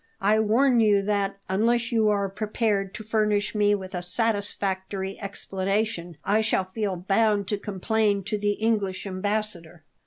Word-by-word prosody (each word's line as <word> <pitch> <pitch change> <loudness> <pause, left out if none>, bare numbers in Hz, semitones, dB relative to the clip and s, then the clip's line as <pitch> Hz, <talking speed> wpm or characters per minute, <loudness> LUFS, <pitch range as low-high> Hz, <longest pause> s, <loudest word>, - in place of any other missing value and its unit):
I 210 +2 +3
warn 240 +4 +3
you 205 -3 +4
that, 200 -1 0
unless 230 +5 +1
you 220 -2 +3
are 200 -1 +1
prepared 205 -1 -1
to 215 - -6
furnish 210 -1 +1
me 205 -1 +3
with 190 -1 -7
a 180 - -2
satisfactory 195 -1 -2
explanation, 195 -3 -2
I 210 +2 +3
shall 215 -3 +1
feel 195 0 -2
bound 200 +2 +1
to 205 - -1
complain 205 +1 0
to 210 +2 -2
the 205 0 +1
English 205 -4 -1
Ambassador." 185 -4 -3
205 Hz, 150 wpm, -25 LUFS, 195-215 Hz, -, you